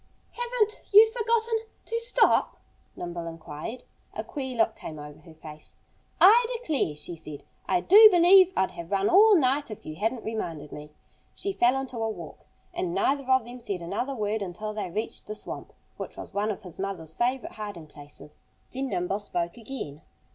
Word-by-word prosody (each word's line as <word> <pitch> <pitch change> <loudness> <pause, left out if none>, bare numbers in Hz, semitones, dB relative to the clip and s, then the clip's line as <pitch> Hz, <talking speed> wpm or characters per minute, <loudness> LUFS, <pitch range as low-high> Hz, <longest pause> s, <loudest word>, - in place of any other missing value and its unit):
"Haven't 475 -3 -1
you 435 +2 +8
forgotten 460 -1 +1 0.3
to 460 +1 -2
stop?" 465 -1 +2 0.4
Nimble 175 -1 -6
inquired. 165 +8 -7 0.3
A - - -3
queer 265 -4 -5
look 225 0 +2
came 155 - -8
over 150 0 -10
her 165 -3 -16
face. 155 -1 -13 0.4
"I 460 +5 +7
declare," 300 - -1
she 150 +4 -6
said, 155 -3 -10 0.2
"I 180 -2 +2
do 425 - +9
believe 370 0 +6
I'd 190 - +2
Have 170 0 -9
run 195 0 +1
all 415 +3 +7
night 280 -1 +1
if 215 - -9
you 155 0 -7
hadn't 225 +4 -1
reminded 165 -10 -5
me." 150 0 -9 0.5
She 395 - -3
fell 250 -4 +3
into 265 -2 -6
a 225 0 -1
walk. 220 - -9 0.3
And 350 0 -3
neither 275 -6 0
of 260 -3 +4
them 245 +1 -9
said 200 -7 -4
another 240 +10 -3
word 215 -1 -2
until 200 +3 -5
they 210 -4 -4
reached 215 +6 -5
the 215 - -5
swamp, - - -8 0.3
which - - -7
was - - -9
one 205 +2 0
of 215 +1 -4
his 180 -2 -11
mother's 185 -5 -5
favorite 250 +4 -1
hiding 205 -6 -7
places. 145 0 -13 0.3
Then 265 +1 -3
Nimble 190 -3 -2
spoke 175 -4 -3
again. 220 - -7
220 Hz, 180 wpm, -27 LUFS, -, 0.5 s, do